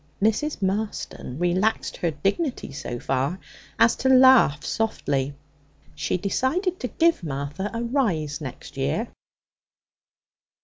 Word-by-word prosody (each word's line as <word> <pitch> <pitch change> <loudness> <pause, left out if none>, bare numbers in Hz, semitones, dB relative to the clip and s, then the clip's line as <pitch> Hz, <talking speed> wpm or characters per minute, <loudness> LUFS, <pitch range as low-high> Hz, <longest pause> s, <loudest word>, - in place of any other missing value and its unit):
Mrs. 220 +4 0
Marston 195 -9 -3
relaxed 180 +6 0
her 170 - 0
dignity 195 - -2
so 135 -4 -5
far 135 +7 -1 0.4
as 230 0 +5
to 265 - +1
laugh 260 - +6
softly. 140 -11 -1 0.6
She 150 +3 -1
decided 315 - 0
to 250 - -2
give 335 - +2
Martha 145 +6 -3
a 230 +1 -3
rise 185 - 0
next 130 -4 -8
year. 70 +1 -1
195 Hz, 115 wpm, -24 LUFS, -, 0.6 s, laugh